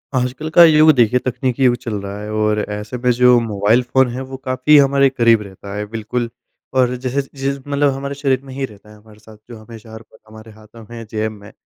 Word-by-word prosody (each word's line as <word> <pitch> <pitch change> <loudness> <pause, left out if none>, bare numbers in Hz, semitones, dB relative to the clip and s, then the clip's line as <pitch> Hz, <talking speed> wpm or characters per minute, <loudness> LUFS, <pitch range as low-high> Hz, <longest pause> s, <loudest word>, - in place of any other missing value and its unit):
आजकल 130 +5 -2
का 175 - +9
युग 155 -1 +6
देखिए 125 -1 +2
तकनीकी 130 +1 -2
युग 120 - +4
चल 115 - -5
रहा 100 +1 -7
है 105 0 -7
और 105 0 0
ऐसे 105 +3 -6
में 125 - +2
जो 125 -1 +5
मोबाइल 110 +1 +1
फ़ोन 130 +1 +2
है 130 - -5
वो 130 - -6
काफ़ी 130 +3 +2
हमारे 140 -1 +4
क़रीब 115 -4 +3
रहता 100 0 -10
है 105 0 -4
बिल्कुल, 115 +2 -3 0.4
और 125 -1 +2
जैसे 130 +2 -2
जैसे 135 0 -5
मतलब 140 0 +1
हमारे 140 +1 -5
शरीर 135 -2 0
में 135 - -10
ही 135 0 -3
रहता 105 -3 -17
है 105 - -15
हमारे 105 0 -19
साथ 110 0 -16
जो 120 - -10
हमेशा 110 0 -13
हर 110 - -10
पल - - -21
हमारे 110 0 -14
हाथों 110 +1 -16
में 115 -1 -9
जेब 110 0 -2
में। 105 -1 -14
120 Hz, 225 wpm, -18 LUFS, 110-135 Hz, 0.4 s, का